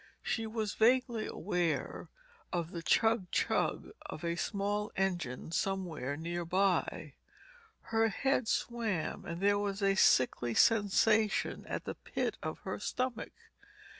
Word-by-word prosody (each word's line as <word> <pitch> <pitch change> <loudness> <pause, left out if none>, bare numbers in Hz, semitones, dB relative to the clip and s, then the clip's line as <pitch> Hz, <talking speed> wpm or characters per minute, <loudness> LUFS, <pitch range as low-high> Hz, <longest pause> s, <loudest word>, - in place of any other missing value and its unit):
She 225 -1 -1
was 220 -2 -2
vaguely 235 -1 +2
aware 180 -5 -2 0.4
of 170 -1 -2
the 170 - -5
chug 220 +1 +2
chug - - 0 0.2
of 175 - -7
a 170 0 -1
small 205 +3 -1
engine 175 -8 -2
somewhere 170 -7 -2
near 170 +2 -3
by. 185 +2 0 0.7
Her 225 0 +1
head 255 +2 0
swam 225 -9 -1
and 170 0 -5
there 205 +1 +3
was 200 0 -2
a 195 0 +4
sickly 125 -9 +3
sensation 215 0 +3
at - - -4
the - - -3
pit - - -3
of - - -4
her - - -4
stomach. 255 -2 -3
200 Hz, 130 wpm, -32 LUFS, 175-225 Hz, 0.7 s, a